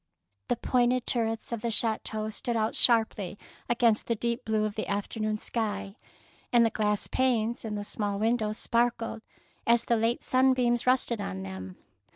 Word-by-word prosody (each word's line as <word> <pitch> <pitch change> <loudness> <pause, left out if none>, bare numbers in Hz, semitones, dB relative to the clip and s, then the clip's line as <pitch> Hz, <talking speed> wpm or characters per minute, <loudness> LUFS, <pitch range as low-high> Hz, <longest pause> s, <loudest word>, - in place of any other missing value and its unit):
The - - +1
pointed 245 +1 +1
turrets 225 -2 -1
of 235 -2 -3
the 235 - -1
chateau 220 -1 0
stood 235 +3 -3
out 220 -1 0
sharply 220 -5 +4 0.3
against 235 -2 +2
the 230 - +1
deep 235 +3 -2
blue 215 -1 +1
of 210 - -3
the 215 - -4
afternoon 215 +1 -2
sky, 205 -3 -3 0.6
and 235 -1 +5
the 225 - +1
glass 210 -1 0
panes 240 -3 0
in 215 -2 -4
the 205 - -3
small 205 -1 -3
windows 220 0 0
sparkled 235 -1 0 0.5
as 235 0 +4
the 235 - +2
late 230 +2 0
sunbeams 255 -2 +2
rested 245 -3 +2
on 95 - -5
them. 95 -1 -8
225 Hz, 165 wpm, -28 LUFS, 210-240 Hz, 0.6 s, and